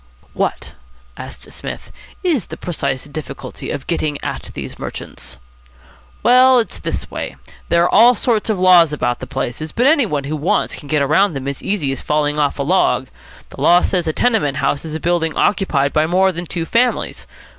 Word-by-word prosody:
"What," - - -3 0.4
asked - - -10
Psmith, - - -7 0.3
"is 315 - 0
the - - -8
precise 140 -6 -3
difficulty 145 +1 -7
of 140 - -4
getting 155 -3 -1
at - - -5
these - - -7
merchants?" - - -7 0.9
"Well, 255 +3 +6
it's 230 - -1
this - - -4
way. - - -5 0.3
There 170 0 +4
are 175 - +1
all 240 +2 +7
sorts 225 -1 0
of 210 -4 0
laws 180 -4 +6
about 120 -5 -1
the 130 - -7
places, 135 +4 -4
but 245 - 0
any 285 -4 +4
one 145 -6 -2
who 145 +3 -3
wants 155 +4 0
can 145 - -11
get 145 -2 +1
round 175 +3 +3
them 135 0 -5
as 140 -1 -4
easy 185 -9 -1
as 135 - -4
falling 150 0 0
off 145 -1 +1
a 140 - -1
log. 145 -5 +1 0.4
The - - -10
law 175 +1 +5
says 180 -3 0
a - - +2
tenement 155 - +1
house 145 0 -1
is 155 -1 -5
a - - -3
building 165 -2 0
occupied 145 -9 +1
by 155 0 +2
more 190 +3 +3
than 175 0 -6
two 170 0 -3
families. 240 +6 0
160 Hz, 190 wpm, -18 LUFS, 145-195 Hz, 0.9 s, all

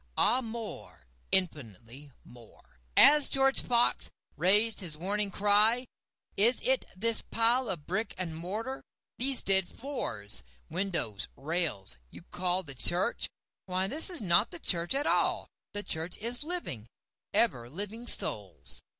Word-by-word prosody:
Ah 255 - +4
more—infinitely 140 - -5
more;(As 120 - +3
George 270 0 +3
Fox 240 0 +2 0.3
rais'd 205 +7 +3
his 165 -5 -5
warning 200 +4 -1
cry, 210 +5 +3 0.5
"Is 230 +5 +2
it - - +1
this 225 +3 +3
pile 235 +2 0
of 170 -6 -6
brick 215 +6 -3
and 170 -4 -5
mortar—these 235 +7 -2
dead 190 -2 +1
floors, 110 - -1 0.3
windows, 170 - -2
rails—you 135 - -3
call 180 +1 0
the 140 -5 -4
church? 175 +8 +2 0.4
Why 185 +1 -1
this 300 - +1
is 350 -4 -5
not 180 +2 +3
the - - -7
church 175 - -1
at 285 +2 +2
all—the 205 -1 -2
Church 165 0 -2
is 235 +3 -1
living, 300 - -4 0.4
ever 120 0 +1
living 210 - -6
Souls.") 100 - +2
190 Hz, 120 wpm, -29 LUFS, 150-235 Hz, 0.5 s, Ah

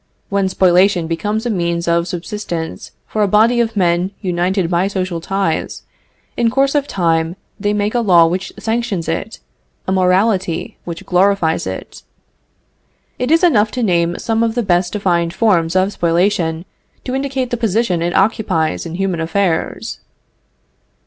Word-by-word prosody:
When 195 -1 +1
spoliation 185 -1 +3
becomes 205 +8 -2
a 240 - 0
means 170 -3 -1
of 170 0 +1
subsistence 175 -2 -5 0.2
for 215 - -3
a 205 - +3
body 225 +5 +4
of 230 -2 0
men 175 0 +2
united 180 0 0
by 175 +2 +1
social 185 -4 -3
ties, 195 -2 -2 0.5
in 235 -1 +2
course 275 +3 +2
of 290 -1 +1
time 165 -2 0 0.2
they 205 0 0
make 210 0 0
a 245 - +2
law 180 -7 +5
which 180 +3 -2
sanctions 220 -6 -2
it, 165 +7 -3 0.5
a - - 0
morality 190 +1 +1
which 170 -1 -7
glorifies 180 - +2
it. 95 0 -7 1.2
It 250 - -1
is 330 +3 +3
enough 220 -11 +4
to 250 - -1
name 170 -4 +1
some 225 0 -1
of 230 0 0
the 240 - 0
best 175 -2 +1
defined 175 -4 0
forms 175 -6 +2
of 190 +2 +2
spoliation 170 -1 0 0.4
to 255 - -4
indicate 270 -2 -2
the - - +1
position 220 -5 0
it 175 +1 -1
occupies 190 -6 +1
in 165 - -6
human 190 -2 -1
affairs. 165 +1 -1
190 Hz, 155 wpm, -17 LUFS, 170-220 Hz, 1.2 s, law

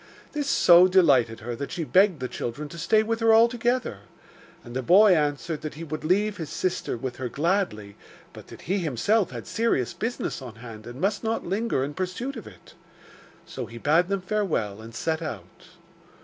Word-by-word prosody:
This 290 -2 -3
so 175 -5 +7
delighted 140 -12 +3
her 120 +2 -5
that 140 +4 -6
she 175 - -3
begged 185 -2 +3
the 130 - -2
children 130 +5 -5
to 170 - -9
stay 215 +6 +3
with 225 +1 -2
her 225 -1 +5
altogether, 235 - +2 0.6
and 120 +1 -10
the 130 - -1
boy 190 - +6
answered 150 +1 -1
that 155 -2 -6
he 160 - -7
would 155 -1 -6
leave 205 +5 +1
his 160 -3 -6
sisters 180 -9 -2
with 125 0 -5
her 130 -2 -4
gladly, 145 - -1 0.4
but - - -12
that - - -12
he 195 +4 -1
himself 180 - +1
had 120 -3 -8
serious 225 - 0
business 230 - -4
on 125 -4 -9
hand 115 -1 -11
and 120 +2 -9
must 200 +5 -1
not 225 0 -2
linger 205 - -1
in 145 +2 -4
pursuit 190 - -4
of 225 - -9
it. - - -15 0.7
So - - -6
he 115 - -10
bade 155 +8 +2
them 195 0 -1
farewell 175 - -2
and 115 +1 -11
set 160 +6 -2
out. 100 - -8
165 Hz, 190 wpm, -25 LUFS, 125-205 Hz, 0.7 s, so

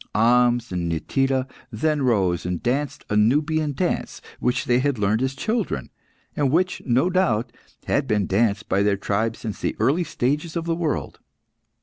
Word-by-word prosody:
Ahmes 120 +1 +3
and 85 -2 -2
Nitida 135 - 0 0.2
then 150 +6 0
rose, 95 -9 +1
and 90 -1 -3
danced 135 +3 -1
a - - +1
Nubian 150 +7 +2
dance 180 +5 -2 0.2
which 125 +1 0
they 120 0 +3
had 140 -1 0
learned 105 +2 +1
as 130 +1 -1
children, 215 - -2 0.4
and 145 -2 +1
which, 180 +6 +1
no 125 +7 +3
doubt, 130 - +1 0.3
had 140 -1 0
been 105 -3 +1
danced 100 0 +1
by 100 - +1
their 100 -1 +2
tribe 110 +3 -1
since 110 -3 -6
the - - -1
early 160 +7 +2 0.2
ages 150 +6 0
of 165 -1 -2
the 170 - 0
world. 165 -3 -3
125 Hz, 165 wpm, -23 LUFS, 105-150 Hz, 0.4 s, Ahmes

